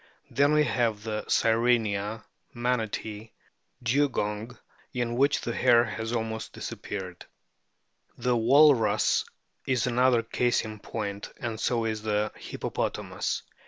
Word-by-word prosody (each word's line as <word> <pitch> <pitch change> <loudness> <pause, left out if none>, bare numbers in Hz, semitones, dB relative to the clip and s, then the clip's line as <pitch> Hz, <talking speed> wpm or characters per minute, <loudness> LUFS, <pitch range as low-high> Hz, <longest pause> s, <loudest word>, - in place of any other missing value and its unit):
Then 140 +2 +3
we 150 0 +5
have 115 -7 0
the 110 -1 -3
Sirenia, 110 -2 +1 0.3
Manatee, 110 -2 -2 0.5
Dugong, 120 -3 0 0.4
in 120 -1 -1
which 140 +3 +2
the 120 - -3
hair 120 -1 +5
has 110 -1 -4
almost 110 -1 -3
disappeared. 95 -3 -6 0.9
The 125 -1 +1
Walrus 130 0 +4 0.4
is 130 -3 +1
another 125 -1 +3
case 120 +1 +1
in 110 -1 -7
point, 100 -1 -5
and 115 -5 -4
so 115 -1 0
is 110 -1 -2
the 105 0 0
Hippopotamus. - - -3
115 Hz, 115 wpm, -27 LUFS, 110-125 Hz, 0.9 s, we